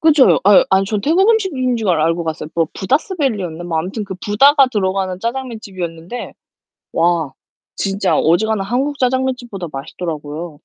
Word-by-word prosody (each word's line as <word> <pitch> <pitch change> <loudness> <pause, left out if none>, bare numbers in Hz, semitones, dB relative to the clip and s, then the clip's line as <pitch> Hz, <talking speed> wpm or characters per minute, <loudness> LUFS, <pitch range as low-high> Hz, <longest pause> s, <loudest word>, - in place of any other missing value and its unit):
그쵸. 305 -4 +5
요 - - +4
아유 200 0 +7
아 190 0 +4
전 205 +1 -2
태국 345 - +3
음식점인 290 - 0
줄 220 -4 -2
알 170 -3 +2
알고 165 +2 +1
갔어요. 155 -1 -4
뭐 165 -1 +2
부다스 295 - -1
밸리였나? 195 - -2
뭐 165 -2 -2
아무튼 190 +6 -3 0.2
부다가 275 +7 +5
들어가는 190 -2 -1
짜장면 240 +1 -3
집이었는데 175 +2 -7 0.6
와 165 -4 +1 0.4
진짜 195 -1 0
어지간한 200 +5 +2
한국 270 +6 -1
짜장면 260 0 +1
집보다 210 -8 -7
맛있더라고요. 150 +2 -6
200 Hz, 385 characters per minute, -18 LUFS, 170-255 Hz, 0.6 s, 아유